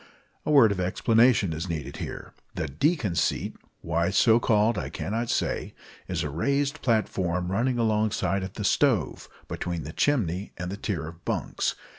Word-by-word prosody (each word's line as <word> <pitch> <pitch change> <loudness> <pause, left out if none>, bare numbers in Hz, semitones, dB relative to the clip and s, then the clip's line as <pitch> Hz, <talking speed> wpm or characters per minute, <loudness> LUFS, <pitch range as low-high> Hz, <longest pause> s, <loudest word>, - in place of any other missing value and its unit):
A - - +1
word 135 -8 +6
of 100 - -2
explanation 110 +1 +3
is 80 +4 -4
needed 80 -4 -4
here. - - -7 0.2
The 80 - -2
"deacon 120 - 0
seat" 80 - 0 0.3
why 85 +1 0
so 110 +4 +5
called 110 0 +3
I 90 - -3
cannot 115 +4 -3
say - - -1 0.3
is - - -2
a 75 - -2
raised 140 - 0
platform 90 -6 0
running 120 +5 +1
alongside 105 -4 +1
of 95 0 -6
the 105 - -5
stove, 115 - +1 0.2
between 85 -3 -4
the 75 - -7
chimney 100 - 0
and 90 0 -4
the 100 - -5
tier 90 -7 -3
of 85 +1 -11
bunks. - - -1
100 Hz, 165 wpm, -26 LUFS, 85-115 Hz, 0.3 s, word